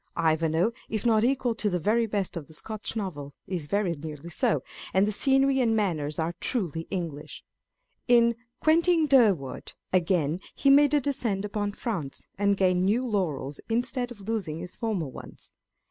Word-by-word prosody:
IvanJwe, 160 +5 +2 0.2
if 215 0 -3
not 220 -2 +4
equal 250 -1 +1
to 220 -2 -1
the 180 - 0
very 220 +7 +1
best 200 -3 -2
of 155 -5 -6
the 160 - -12
Scotch 215 +5 -5
Novels, 150 -10 -5
is 175 -5 -4
very 200 0 0
nearly 155 +1 -8
so; 150 -4 +1 0.3
and 190 +1 +5
the 210 - 0
scenery 270 +4 +3
and 225 -2 +2
manners 155 -8 0
are 165 +1 -1
truly 165 - -1
English. 160 -5 -5 0.6
In 235 -1 +5 0.3
Quentin 330 +1 +4
Durward, 215 - +2 0.2
again, 175 -3 +1 0.2
he 275 - +4
made 290 +1 +6
a 290 - +3
descent 235 -8 -1
upon 205 0 -2
France, 185 - -4
and 200 0 +2
gained 185 -2 +2
new 220 +7 +2
laurels, 155 - -2
instead 245 +2 -1
of 235 -4 -11
losing 195 -7 -3
his 180 +2 -8
former 210 -9 -2
ones. 130 - -11
200 Hz, 165 wpm, -27 LUFS, 165-235 Hz, 0.6 s, made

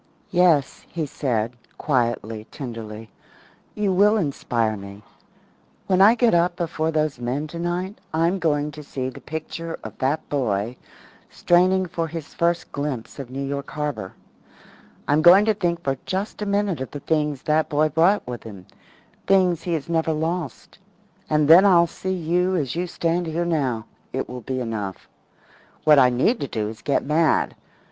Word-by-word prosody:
"Yes," 175 -6 +3
he 165 -3 -3
said, 125 -5 -2 0.2
quietly, 115 -5 -1
tenderly, 115 -5 -8 0.6
"you 205 -2 +1
will 205 +4 +4
inspire 120 - -1
me. 100 +1 -10 0.8
When 185 0 +2
I 215 +4 +7
get 240 -1 +3
up 175 +1 +3
before 165 -2 -2
those 155 -4 0
men 125 +5 -2
tonight 175 +5 -4
I'm 165 +4 +1
going 150 -3 0
to 150 +1 -9
see 130 -3 -4
the 130 - -11
picture 160 +1 -6
of - - -8
that 140 +4 0
boy 115 -4 -1 0.5
straining 185 +2 +3
for 170 -2 -3
his 160 -1 -7
first 170 0 0
glimpse 140 -4 -4
of 135 -3 -6
New 135 +2 -4
York 140 0 -4
Harbour. 150 -10 -4 0.9
I'm 150 +2 +3
going 180 +5 +8
to 220 - +3
think 175 -4 -2
for 135 -2 0
just 195 +3 -3
a 210 - -2
minute 200 -6 0
of 130 - -4
the 145 - -7
things 150 -3 -1
that 155 +1 +1
boy 155 0 +2
brought 170 +7 +3
with 120 -1 -6
him 100 -5 -11 0.6
things 185 -4 +3
he 175 0 -2
has 155 -4 -2
never 165 -1 +1
lost. 160 -2 -4 0.5
And 150 -1 +2
then 170 +5 +9
I'll 175 -4 +6
see 185 +2 -5
you 180 +1 0
as 140 -6 -1
you 180 +1 -1
stand 170 0 -1
here 165 +2 -1
now 135 -9 -1 0.3
it 130 - -2
will 125 0 -7
be 130 +3 -3
enough. 105 -5 -5 0.8
What 150 -2 +6
I 130 -2 +6
need 130 - +1
to 140 - -3
do 105 -3 -2
is 110 - -9
to - - -22
get 140 - +1
mad. 155 +2 +2
155 Hz, 170 wpm, -23 LUFS, 130-175 Hz, 0.9 s, then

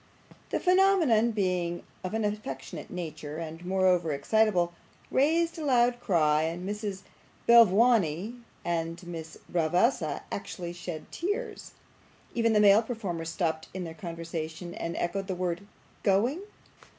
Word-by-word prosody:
The - - 0
phenomenon, 360 - +4
being 180 -5 -1 0.2
of 185 +3 -3
an 220 -1 0
affectionate 205 -10 -5
nature 155 -4 -6
and 165 +1 -6
moreover 180 -3 +2
excitable, 175 +3 +2 0.4
raised 330 +5 +2
a - - -4
loud 245 -3 +3
cry, 155 -9 +3
and 165 +3 -2
Miss 205 -1 -4 0.4
Belvawney 225 -4 +5 0.3
and 165 0 -2
Miss 165 -2 -7
Bravassa 170 - +1
actually 175 -3 -5
shed 175 -2 -7
tears. 410 +8 -4 0.6
Even 230 -1 +2
the 210 - +4
male 205 +1 +7
performers 195 -9 -4
stopped 160 -2 -1
in 185 - -3
their 165 -2 -6
conversation, 165 0 -6
and 170 - -4
echoed 195 +3 -2
the 190 - -2
word 180 +2 -3 0.3
'Going! 230 - +2
185 Hz, 125 wpm, -29 LUFS, 165-225 Hz, 0.6 s, male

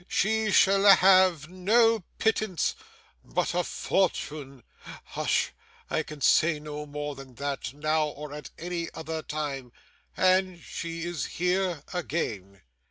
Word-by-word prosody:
She 220 +2 +1
shall 195 0 +5
have 185 -5 +6
no 215 +4 +3
pittance, 215 -5 +1 0.5
but 180 -1 -1
a 180 0 +1
fortune 145 - -2 0.4
Hush! - - -1 0.4
I - - +1
can 150 -2 -10
say 155 +3 +4
no 150 0 -7
more 145 0 -4
than 135 -2 -12
that, 140 -3 -3
now 155 +1 +1
or 150 0 -8
at 150 -1 -8
any 170 -1 -4
other 160 0 -4
time, 145 -5 -4 0.5
and 185 -1 +3
she 165 0 -6
is 170 -6 -3
here 180 -3 -1
again! 105 - -4
165 Hz, 125 wpm, -27 LUFS, 145-185 Hz, 0.5 s, have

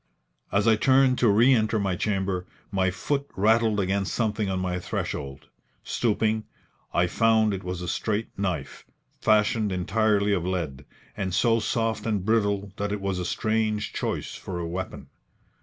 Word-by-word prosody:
As 100 +2 +2
I 110 -1 +5
turned 130 +1 +4
to 120 - +4
re 115 +6 +5
enter 110 -2 +2
my 100 -3 0
chamber, 95 -2 -1 0.2
my 95 -1 +2
foot 140 +10 -2
rattled 110 +1 +3
against 95 0 0
something 110 -3 0
on 95 - -1
my 90 -1 -2
threshold. 70 -5 -4 0.4
Stooping, 110 -1 0 0.5
I 85 - +3
found 110 +3 +3
it 95 - -4
was 90 0 -4
a - - -4
straight 105 +5 -1
knife, 95 -4 -3 0.4
fashioned 105 0 +2
entirely 105 +2 +1
of 90 -4 0
lead, 80 -7 -3 0.3
and 95 -3 -2
so 115 +4 +3
soft 115 0 -1
and 105 -4 -1
brittle 100 -3 +1
that 100 0 -2
it 105 - -2
was 95 -2 -2
a 90 - -3
strange 110 +1 -1
choice - - -3
for 90 - -6
a 85 - -3
weapon. 95 +2 -5
100 Hz, 160 wpm, -26 LUFS, 95-110 Hz, 0.5 s, I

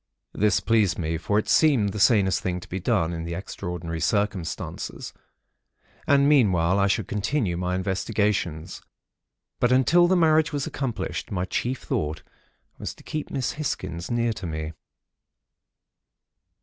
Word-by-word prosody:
"This 105 -1 +2
pleased 110 -5 +2
me; 80 -1 -2
for 105 +5 0
it 105 - 0
seemed 135 -10 +4
the 105 - -5
sanest 95 -2 +4
thing 90 -1 -2
to - - -12
be 95 - -4
done, 85 -5 +1
in 80 -1 -4
the 85 0 -4
extraordinary 85 -2 -5
circumstances; 100 -4 -2 0.9
and 140 0 +5
meanwhile 95 - +4
I 100 - +3
should 100 0 0
continue 105 -2 -1
my 90 +1 -1
investigations; 95 -3 -1 0.8
but 120 - +2
until 165 +7 +5
the 185 - +3
marriage 160 -1 +4
was 145 -2 -2
accomplished, 130 -5 -4
my 90 -2 -1
chief 125 +7 -2
thought 75 +1 -2 0.6
was - - -5
to - - -17
keep 155 -1 -4
Miss 130 -3 -1
Hisgins 85 - -3
near 120 -1 +1
to 95 -4 -6
me. 80 0 -4
100 Hz, 145 wpm, -25 LUFS, 85-125 Hz, 0.9 s, and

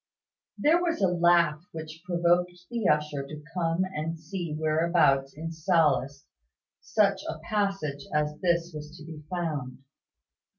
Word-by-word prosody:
There 325 +4 +4
was 340 -2 0
a 190 -2 +3
laugh 170 -3 +3
which 160 0 -8
provoked 175 0 +2 0.2
the 235 -4 0
usher 150 -1 +1
to 150 +2 -9
come 170 0 +1
and 165 -2 -4
see 170 0 -5
whereabouts 155 -3 +2
in 165 +2 -5
Sallust 155 -5 +1 0.5
such 195 -1 +2
a 160 - -4
passage 195 -8 -2
as 150 0 +1
this 170 -1 +1
was 150 +2 -8
to 155 - -11
be 160 -2 -9
found. 150 -7 -3
165 Hz, 135 wpm, -28 LUFS, 150-180 Hz, 0.5 s, There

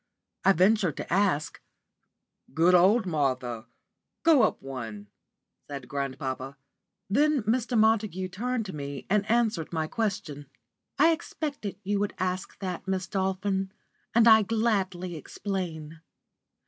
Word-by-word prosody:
I 195 - +6
ventured 185 -2 +3
to - - -4
ask. 185 -6 +1 0.9
"Good 170 +3 +4
old 195 +6 +5
Martha! 130 -8 -1 0.6
Go 320 -6 +6
up - - +2
one," 115 -6 -7 0.6
said 140 -3 -7
grandpapa. 135 -1 -4 0.5
Then 285 +4 +2
Mr. 235 +2 0
Montague 215 -4 +2
turned 235 +5 -2
to 190 - -7
me 140 -2 -6
and 210 0 +2
answered 220 -8 +1
my 160 -2 -1
question. 155 - -3 0.5
"I 315 +4 +6
expected 295 - -4
you 200 +1 0
would 205 0 -2
ask 185 0 -3
that, 185 0 -4
Miss 190 -1 -1
Dolphin, 190 0 -1 0.4
and 235 0 +6
I 220 -1 +8
gladly 195 -5 -1
explain. 165 -3 -5
190 Hz, 120 wpm, -27 LUFS, 155-220 Hz, 0.9 s, I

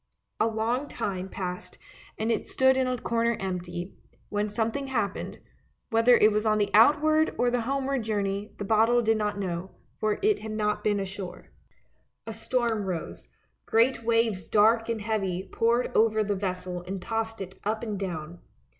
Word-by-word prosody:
A - - +3
long 230 +5 -1
time 190 -6 -4
passed 180 -2 -6 0.4
and 220 +2 0
it - - -1
stood 265 0 +3
in 260 -1 +1
a 255 0 -1
corner 235 0 0
empty, 180 -1 -4 0.4
when 210 0 -1
something 230 +6 -2
happened 220 -7 -2 0.3
— - - -43
whether 230 +2 +5
it 215 - +5
was 210 0 +1
on 215 -1 +2
the 205 -1 0
outward 310 +7 +5
or 245 0 +2
the 245 -1 +1
homeward 275 +2 -1
journey, 205 -1 -2
the 205 - -4
bottle 225 +3 +3
did 225 0 +3
not 210 -1 -1
know, 185 -1 -4 0.2
for 215 -1 +1
it 425 0 +3
had 220 0 -6
not 210 -1 -1
been 205 -1 +1
ashore. 195 -1 -7 0.7
A - - -5
storm 235 -5 -1
rose, 175 -3 -5 0.4
great 230 +1 +3
waves 225 -6 +1
dark 225 +2 +4
and 225 -2 -1
heavy 195 -4 -2
poured 235 +2 +1
over 220 -1 +4
the 205 0 -1
vessel 185 -2 -3
and 190 +1 -4
tossed 225 +3 -3
it 190 0 -8
up 220 +2 -1
and 210 -4 -3
down. 175 -3 -5
215 Hz, 170 wpm, -27 LUFS, 195-235 Hz, 0.7 s, whether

